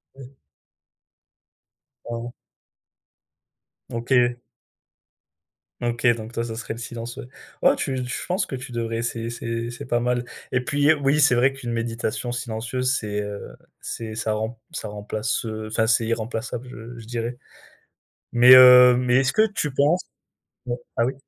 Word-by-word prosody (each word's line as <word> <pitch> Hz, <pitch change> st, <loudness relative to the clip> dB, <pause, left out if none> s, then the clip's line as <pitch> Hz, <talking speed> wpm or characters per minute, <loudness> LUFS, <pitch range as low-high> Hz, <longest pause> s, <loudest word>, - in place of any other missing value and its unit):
Ouais. 135 Hz, 0 st, -13 dB, 1.7 s
Ah. 120 Hz, 0 st, -5 dB, 1.6 s
OK. 120 Hz, +1 st, +2 dB, 1.5 s
OK, 120 Hz, +1 st, -1 dB
donc 110 Hz, +1 st, -8 dB
toi, 115 Hz, -, -2 dB
ça 115 Hz, -1 st, -5 dB
serait 115 Hz, -, -5 dB
le 115 Hz, -, -8 dB
silence, 120 Hz, 0 st, -7 dB
ouais. -, -, -7 dB, 0.3 s
Oh, -, -, +5 dB
tu 130 Hz, -, -2 dB
tu -, -, -5 dB
je 125 Hz, -, -4 dB
penses 185 Hz, +2 st, 0 dB
que 135 Hz, -, -5 dB
tu 125 Hz, 0 st, -9 dB
devrais 115 Hz, -1 st, -2 dB
essayer 115 Hz, 0 st, -3 dB
c'est 115 Hz, 0 st, -4 dB
c'est 120 Hz, -, -8 dB
pas 120 Hz, -1 st, 0 dB
mal 125 Hz, 0 st, 0 dB, 0.3 s
et 125 Hz, 0 st, 0 dB
puis, 145 Hz, +3 st, +3 dB
oui, 145 Hz, +1 st, +1 dB
c'est 135 Hz, -3 st, +5 dB
vrai 130 Hz, +3 st, +3 dB
qu'une 130 Hz, -3 st, -6 dB
méditation 115 Hz, +1 st, -3 dB
silencieuse 125 Hz, +2 st, -2 dB
c'est, 105 Hz, -1 st, -3 dB
heu, 105 Hz, 0 st, -7 dB, 0.3 s
c'est 110 Hz, -1 st, -6 dB
ça 110 Hz, 0 st, -1 dB
remp 110 Hz, +2 st, -3 dB
ça 110 Hz, -, -6 dB
remplace, 105 Hz, +3 st, -3 dB
heu, 110 Hz, -1 st, -5 dB
enfin, 110 Hz, 0 st, +1 dB
c'est 115 Hz, 0 st, +2 dB
irremplaçable, 115 Hz, +2 st, -3 dB
je 115 Hz, 0 st, -10 dB
je 115 Hz, -, -10 dB
dirais 120 Hz, +1 st, -4 dB, 1.0 s
mais 120 Hz, +1 st, +9 dB
heu, 125 Hz, -1 st, +9 dB
mais 125 Hz, 0 st, +2 dB
est-ce 135 Hz, 0 st, +2 dB
que 220 Hz, +1 st, +5 dB
tu 195 Hz, -8 st, -3 dB
penses 150 Hz, +6 st, +3 dB, 0.7 s
oh, 120 Hz, 0 st, -2 dB, 0.2 s
ah 115 Hz, -, +3 dB
oui? 130 Hz, -, -2 dB
120 Hz, 160 wpm, -23 LUFS, 115-125 Hz, 1.7 s, mais